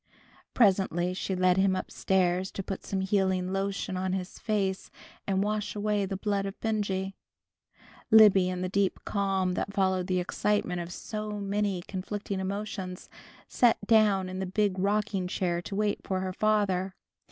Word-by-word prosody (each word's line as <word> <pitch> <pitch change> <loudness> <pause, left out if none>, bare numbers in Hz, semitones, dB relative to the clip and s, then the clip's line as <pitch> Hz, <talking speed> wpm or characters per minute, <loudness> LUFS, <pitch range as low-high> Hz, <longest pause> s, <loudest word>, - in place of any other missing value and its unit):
Presently 190 -5 +3
she 190 +1 -3
led 185 0 +3
him 190 0 +3
up - - -4
stairs 185 0 +1
to 195 - -4
put 195 0 -5
some 195 -1 -2
healing 190 -1 +1
lotion 195 -1 -2
on 185 0 -1
his 185 -1 -4
face, 195 -3 -1 0.4
and 195 0 +1
wash 210 0 -2
away 205 -1 0
the 195 0 -3
blood 200 0 -1
of 195 - -8
Benjy. 200 -3 -1 1.0
Libby, 205 -4 +7
in 180 0 -3
the 185 - -1
deep 195 +1 +1
calm 195 -2 0
that 200 +2 -3
followed 190 -2 +1
the 185 -1 +1
excitement 180 0 0
of 170 +1 -7
so 210 +2 -5
many 200 -2 -1
conflicting 200 +1 -4
emotions, 190 -1 -5 0.4
sat 240 -2 +3
down 210 -4 +4
in 185 0 -5
the 190 - -2
big 195 0 0
rocking 200 -1 0
chair 175 -1 -1
to 195 - -6
wait 210 0 0
for 190 -1 -1
her 185 0 -3
father. 195 -3 +1
195 Hz, 165 wpm, -28 LUFS, 185-205 Hz, 1.0 s, Libby